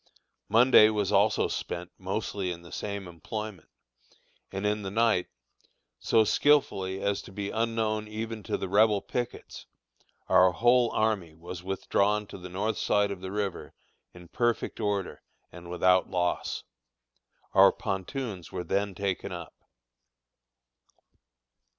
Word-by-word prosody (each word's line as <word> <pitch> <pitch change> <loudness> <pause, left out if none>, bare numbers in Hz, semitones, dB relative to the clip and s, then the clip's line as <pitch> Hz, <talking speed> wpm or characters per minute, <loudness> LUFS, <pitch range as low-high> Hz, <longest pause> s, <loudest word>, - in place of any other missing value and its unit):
Monday 115 -2 +7
was 105 -3 -1
also 105 +2 +3
spent 90 0 -5
mostly 95 0 -3
in 85 0 -7
the 85 - -13
same 100 -2 -5
employment, 95 +2 -7 0.8
and 95 +1 -4
in 105 0 0
the 95 - -4
night, 110 -2 +2 0.7
so 110 - +3
skilfully 100 -7 +2
as 100 0 -1
to - - -13
be 100 +1 -4
unknown 110 -1 -1
even 110 +1 -5
to - - -2
the 95 - -4
Rebel 105 +1 +3
pickets, 120 -1 -5 0.6
our 90 -1 +5
whole 120 +4 +4
army 100 -8 -1
was 85 +2 -8
withdrawn 100 +2 0
to 100 - -10
the 90 0 -8
north 105 +4 -2
side 105 -1 +2
of 95 -2 -6
the 95 0 -6
river 100 -2 -4 0.4
in 90 -1 -14
perfect 120 +4 -1
order 105 -3 -2 0.3
and 85 0 -11
without 90 +1 +3
loss. 90 -1 -1 0.9
Our 95 0 +7
pontoons 100 -1 -4
were 90 - -4
then 100 +3 -1
taken 100 0 -2
up. 85 -2 -7
100 Hz, 130 wpm, -28 LUFS, 90-110 Hz, 0.9 s, Monday